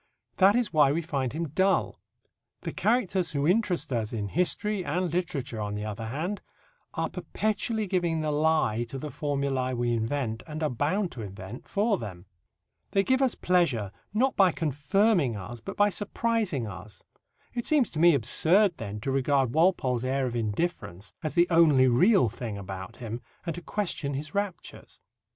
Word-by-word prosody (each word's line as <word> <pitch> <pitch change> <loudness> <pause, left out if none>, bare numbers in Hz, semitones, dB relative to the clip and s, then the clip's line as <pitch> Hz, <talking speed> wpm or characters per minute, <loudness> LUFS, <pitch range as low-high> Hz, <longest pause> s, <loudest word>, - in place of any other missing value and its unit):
That 195 +2 +6
is 240 -5 0
why 145 -3 +5
we 165 +3 -1
find 135 -5 -2
him 160 +1 -3
dull. 190 +6 +1 0.6
The - - -4
characters 190 -7 +1
who 140 -1 0
interest 180 - +1
us 110 -2 -1
in 105 -3 -3
history 185 - 0
and 175 +1 -1
literature, 140 -10 -2
on 105 0 -3
the 105 +1 -4
other 110 +1 -5
hand, 165 - -3 0.5
are - - 0
perpetually 215 +1 -2
giving 175 -4 0
the 155 -1 -1
lie 150 -7 +2
to 135 - -5
the 150 +2 -6
formulae 140 -2 -1
we 120 0 0
invent, 115 0 -2
and 155 0 -5
are 150 - +1
bound 165 - 0
to 120 - -7
invent, 100 - -8
for 205 0 +1
them. 95 -4 -8 0.7
They 195 - +3
give 260 +5 +2
us 260 -3 +2
pleasure 145 - +1 0.2
not 250 +6 +1
by 190 -3 +5
confirming 155 - +1
us, 105 +5 -7
but 115 - -8
by 205 0 +5
surprising 205 - -1
us. 95 0 -10 0.5
It 240 - -3
seems 290 -6 +3
to 155 - -4
me 170 -1 +6
absurd, 170 - +3
then, 105 -3 -5
to 135 - -2
regard 135 -2 +1
Walpole's 145 -7 +2
air 130 +1 0
of 120 -1 -3
indifference 105 - -3
as 155 - -3
the 175 0 +5
only 155 -6 +6
real 175 - +5
thing 110 -1 -5
about 95 -1 -7
him 115 0 -6 0.2
and 170 - -2
to 175 - -7
question 170 -8 -2
his 145 +2 -5
raptures. 200 -3 -5
150 Hz, 175 wpm, -27 LUFS, 120-185 Hz, 0.7 s, That